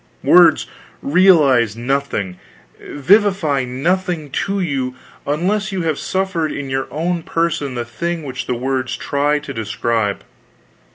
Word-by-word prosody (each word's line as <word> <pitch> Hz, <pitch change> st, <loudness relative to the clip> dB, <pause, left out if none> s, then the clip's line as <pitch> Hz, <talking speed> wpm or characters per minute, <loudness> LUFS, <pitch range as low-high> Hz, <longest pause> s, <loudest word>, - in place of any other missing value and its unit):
Words -, -, +6 dB, 0.4 s
realize 140 Hz, -, +4 dB
nothing, 120 Hz, -8 st, -2 dB, 0.4 s
vivify 165 Hz, -4 st, +2 dB
nothing 165 Hz, +4 st, -1 dB
to 200 Hz, +7 st, -1 dB
you, 135 Hz, -7 st, -2 dB, 0.3 s
unless 190 Hz, +7 st, 0 dB
you 190 Hz, -3 st, -2 dB
have 160 Hz, -3 st, -1 dB
suffered 185 Hz, -5 st, -1 dB
in 140 Hz, -2 st, -5 dB
your 135 Hz, 0 st, -1 dB
own 170 Hz, +2 st, -2 dB
person 160 Hz, -5 st, -1 dB
the 120 Hz, -1 st, -3 dB
thing 170 Hz, +8 st, -4 dB
which 130 Hz, -3 st, -6 dB
the 125 Hz, -, -1 dB
words 130 Hz, +1 st, -2 dB
try 145 Hz, +1 st, 0 dB
to 145 Hz, -2 st, -7 dB
describe. 110 Hz, -2 st, -2 dB
145 Hz, 125 wpm, -18 LUFS, 130-175 Hz, 0.4 s, Words